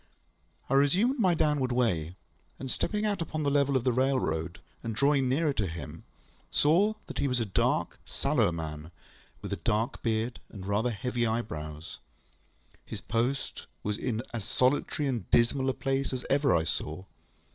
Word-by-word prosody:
I -, -, -1 dB
resumed 185 Hz, -, +3 dB
my 185 Hz, -5 st, +4 dB
downward 150 Hz, -5 st, +1 dB
way, 90 Hz, -10 st, +1 dB, 0.4 s
and 130 Hz, -1 st, -4 dB
stepping 210 Hz, 0 st, -1 dB
out 205 Hz, -4 st, 0 dB
upon 155 Hz, -1 st, -2 dB
the 140 Hz, -, +2 dB
level 140 Hz, -1 st, +3 dB
of 125 Hz, -, -2 dB
the 125 Hz, -, +3 dB
railroad, 105 Hz, -11 st, 0 dB, 0.2 s
and 115 Hz, -2 st, -4 dB
drawing 140 Hz, +1 st, +3 dB
nearer 145 Hz, +2 st, +2 dB
to 105 Hz, -6 st, 0 dB
him, 85 Hz, 0 st, -7 dB, 0.4 s
saw 190 Hz, +9 st, +3 dB
that -, -, -6 dB
he -, -, +2 dB
was 125 Hz, -2 st, +1 dB
a 115 Hz, -, 0 dB
dark, 95 Hz, -, 0 dB
sallow -, -, +1 dB
man, 80 Hz, -1 st, -5 dB, 0.5 s
with -, -, -3 dB
a -, -, -2 dB
dark 110 Hz, +5 st, 0 dB
beard 115 Hz, +1 st, -1 dB
and 95 Hz, -3 st, -9 dB
rather 105 Hz, +5 st, +1 dB
heavy 120 Hz, +2 st, -1 dB
eyebrows. 80 Hz, -9 st, -4 dB, 0.8 s
His -, -, -6 dB
post 120 Hz, +5 st, -2 dB, 0.2 s
was 105 Hz, 0 st, 0 dB
in 120 Hz, -2 st, -2 dB
as 115 Hz, -3 st, -3 dB
solitary 140 Hz, +5 st, +1 dB
and 125 Hz, -4 st, -2 dB
dismal 130 Hz, +3 st, +3 dB
a -, -, +1 dB
place 135 Hz, -1 st, -1 dB
as 125 Hz, -, -4 dB
ever 140 Hz, -, +4 dB
I 80 Hz, -, +2 dB
saw. 80 Hz, +2 st, -2 dB
125 Hz, 170 wpm, -29 LUFS, 105-140 Hz, 0.8 s, my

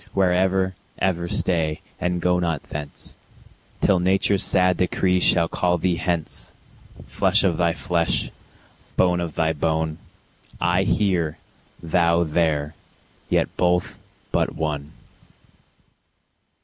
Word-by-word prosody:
Where 95 Hz, -2 st, +3 dB
ever, 95 Hz, +1 st, +1 dB, 0.2 s
ever 85 Hz, -2 st, 0 dB
stay, 80 Hz, -3 st, 0 dB, 0.2 s
and 90 Hz, -1 st, -1 dB
go 90 Hz, 0 st, +2 dB
not 85 Hz, -4 st, -1 dB
thence, 75 Hz, -1 st, -8 dB, 0.6 s
Till 95 Hz, -3 st, +3 dB
nature's 95 Hz, +2 st, +2 dB
sad 90 Hz, 0 st, +3 dB
decree 90 Hz, 0 st, +1 dB
shall 85 Hz, -2 st, +4 dB
call 90 Hz, +1 st, 0 dB
thee 90 Hz, 0 st, 0 dB
hence; 85 Hz, -3 st, -3 dB, 0.5 s
Flesh -, -, +2 dB
of 90 Hz, -5 st, +1 dB
thy 85 Hz, -1 st, +2 dB
flesh, 85 Hz, -2 st, 0 dB, 0.7 s
bone 90 Hz, -1 st, +3 dB
of 85 Hz, -3 st, -4 dB
thy 80 Hz, -1 st, +1 dB
bone, 80 Hz, 0 st, -1 dB, 0.6 s
I 90 Hz, +2 st, +2 dB
here, 90 Hz, -8 st, +1 dB, 0.5 s
thou 85 Hz, +1 st, +2 dB
there, 75 Hz, -2 st, 0 dB, 0.6 s
yet -, -, +1 dB
both 90 Hz, 0 st, +1 dB, 0.3 s
but -, -, 0 dB
one. 75 Hz, -2 st, -3 dB
85 Hz, 115 wpm, -23 LUFS, 80-90 Hz, 0.7 s, shall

